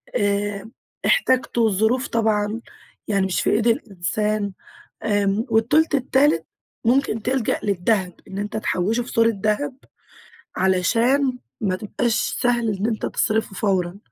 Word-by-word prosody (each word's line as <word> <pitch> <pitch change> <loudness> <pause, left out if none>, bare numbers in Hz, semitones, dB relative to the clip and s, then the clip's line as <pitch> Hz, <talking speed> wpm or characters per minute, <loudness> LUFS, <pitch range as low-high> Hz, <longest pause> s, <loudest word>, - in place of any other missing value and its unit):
آآ 205 +1 -1 0.3
احتجته، 255 - +2
الظروف 220 +5 +1
طبعًا 220 -1 0 0.5
يعني 200 -2 +1
مش 185 -2 0
في - - +1
إيد 215 +2 +2
الإنسان، 210 - -1 0.5
امم، 205 0 +1
والتُلت 240 +9 +3
التالت 265 - +2 0.4
ممكن 235 -2 +2
تلجأ 255 -1 0
للدهب 190 -1 0
إن 190 - -6
أنت 205 +2 -3
تحوّشه 215 +3 0
في 240 - -10
صورة 230 -1 +3
دهب 220 +6 -1 0.8
علشان 245 +8 +2 0.2
ما 195 -4 0
تبقاش 225 +4 -1 0.3
سهل 240 -2 +2
إن 200 - -2
أنت 225 -2 -2
تصرفه 220 -2 0
فورًا. 190 -2 0
220 Hz, 125 wpm, -22 LUFS, 200-240 Hz, 0.8 s, والتُلت